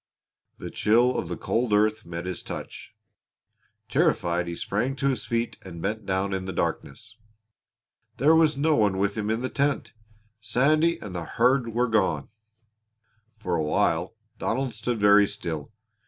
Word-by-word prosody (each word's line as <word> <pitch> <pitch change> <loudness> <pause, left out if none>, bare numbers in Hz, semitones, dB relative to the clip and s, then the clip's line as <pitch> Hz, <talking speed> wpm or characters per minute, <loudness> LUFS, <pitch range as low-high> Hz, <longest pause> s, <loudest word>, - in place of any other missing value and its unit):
The - - -7
chill 120 +4 +3
of - - -2
the - - -4
cold 115 -2 -1
earth 105 0 +2
met 85 0 -5
his 90 0 -4
touch. - - -8 0.9
Terrified 85 0 +1
he 85 - -4
sprang 120 +10 -2
to 140 0 0
his 125 -6 -2
feet 115 0 -2
and 85 -3 -9
bent 110 +4 -3
down 95 +1 0
in 95 -1 -3
the 95 - -4
darkness. 110 +5 -4 1.0
There 150 +5 +5
was 160 -3 +4
no 155 +2 +3
one 105 -4 +2
with 100 +1 0
him 105 -1 -2
in 110 +3 -1
the - - 0
tent! 140 0 -1 0.5
Sandy 155 +9 +2
and 100 -4 -7
the 85 -2 -4
herd 120 -1 +1
were 125 +1 +2
gone! 95 - +1 1.1
For 90 -5 -4
a 80 - 0
while 80 +5 0 0.2
Donald 130 +1 -1
stood 115 +2 -2
very 105 0 +6
still. 85 -7 -5
110 Hz, 160 wpm, -26 LUFS, 95-125 Hz, 1.1 s, very